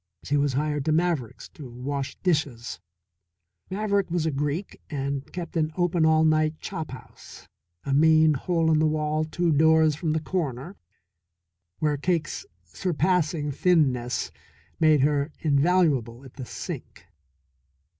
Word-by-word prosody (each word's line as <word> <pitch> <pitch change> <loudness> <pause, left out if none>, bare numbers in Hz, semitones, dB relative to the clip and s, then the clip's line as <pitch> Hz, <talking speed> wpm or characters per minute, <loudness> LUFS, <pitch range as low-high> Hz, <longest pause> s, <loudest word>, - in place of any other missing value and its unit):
She 145 - -1
was 145 -1 +1
hired 150 +1 -1
to 155 - +1
Maverick's 160 -7 -1
to 140 -5 -11
wash 135 +3 -4
dishes. 135 - -1 0.9
Maverick 200 -1 0
was 170 -1 -1
a 160 - +1
Greek 150 +6 -3
and 140 -1 -4
kept 175 0 -6
an 155 -1 +1
open 175 -2 +2
all 160 0 +4
night 155 0 +2
chop 160 -1 -5
house, 130 - -12 0.4
a 135 - -2
mean 155 +1 +5
hole 165 +3 0
in 155 - +3
the 155 - +3
wall 155 0 0
two 170 +2 0
doors 160 +1 +4
from 155 0 -1
the 160 - +1
corner, 155 -1 -3 1.0
where 150 -2 0
Cake's 170 - -2 0.2
surpassing 165 -3 0
thinness 130 -7 +1 0.5
made 155 -3 +4
her 145 +1 +1
invaluable 140 -6 +2
at 130 - -13
the 130 - -8
sink. - - -7
155 Hz, 135 wpm, -25 LUFS, 140-165 Hz, 1.0 s, mean